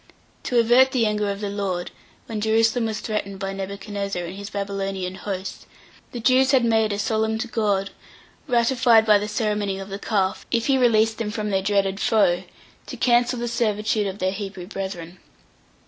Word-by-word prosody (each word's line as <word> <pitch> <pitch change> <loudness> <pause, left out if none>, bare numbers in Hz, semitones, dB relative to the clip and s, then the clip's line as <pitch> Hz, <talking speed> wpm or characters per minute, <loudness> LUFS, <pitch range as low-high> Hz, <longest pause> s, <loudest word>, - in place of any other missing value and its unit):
To 245 - 0
avert 245 +3 +5
the 240 -3 +2
anger 210 -1 0
of 200 +1 -4
the 205 - -2
Lord, 195 -3 -3 0.3
when 220 -2 -4
Jerusalem 225 +2 +2
was 220 -1 -4
threatened 200 -3 -3
by 195 0 -4
Nebuchadnezzar 200 -1 -4
and 175 +2 -7
his 200 +1 -7
Babylonian 195 -2 -3
host, 190 -1 -6 0.4
the 240 - -5
Jews 255 +3 +4
had 255 -3 +4
made 220 -2 +2
a 205 - -1
solemn 220 +1 0
to 220 - -3
God, 205 -4 0 0.6
ratified 235 -2 +4
by 210 -2 +5
the 210 - -3
ceremony 210 -2 -1
of 195 0 -7
the 195 +1 -5
calf, 195 -3 -1
if 230 -1 0
He 275 - +3
released 225 -2 +3
them 225 -2 -2
from 210 -1 -3
their 190 -1 +1
dreaded 195 -1 0
foe, 190 -6 +2 0.4
to - - -7
cancel 245 0 +2
the 240 0 -3
servitude 215 -2 0
of 190 0 -5
their 185 -1 0
Hebrew 195 -2 -6
brethren. 185 -3 -6
210 Hz, 180 wpm, -23 LUFS, 195-225 Hz, 0.6 s, avert